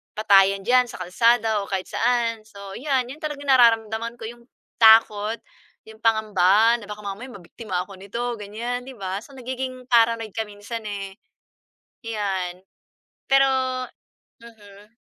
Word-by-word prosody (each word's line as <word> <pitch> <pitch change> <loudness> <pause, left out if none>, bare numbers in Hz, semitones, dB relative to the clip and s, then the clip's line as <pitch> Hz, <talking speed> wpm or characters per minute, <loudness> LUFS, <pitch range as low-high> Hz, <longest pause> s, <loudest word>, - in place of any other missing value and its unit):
patayan 195 -2 +4
diyan 250 +2 +3
sa 235 - -10
kalsada 225 +3 +2
o - - -10
kahit 190 -1 -4
saan. 230 -2 0
So 200 -2 -11
‘yan, 260 -3 -1
‘yan 295 - -11
talagang 285 -2 -5
nararamdaman 230 -2 +3
ko 230 - -13
'yong 235 0 -15 0.3
takot, 220 -1 +5 0.5
'yong 220 0 -14
pangamba 220 0 +3
na 205 - -12
baka 210 0 -8
mamaya 200 +6 -6
mabiktima 185 -2 -6
ako 195 -2 -13
nito 235 +5 -4
ganiyan, 235 +5 -5
‘di 265 - -9
ba. 190 -2 -4
So 275 +6 -15
nagiging 255 0 -6
paranoid 230 -2 +3
ka 220 -1 -3
minsan 210 +2 -8
eh. 195 -1 -6 0.9
‘Yan, 190 -4 -3 0.7
pero 270 0 +5 1.0
mhm. 210 -1 -16
225 Hz, 140 wpm, -23 LUFS, 200-240 Hz, 1.0 s, takot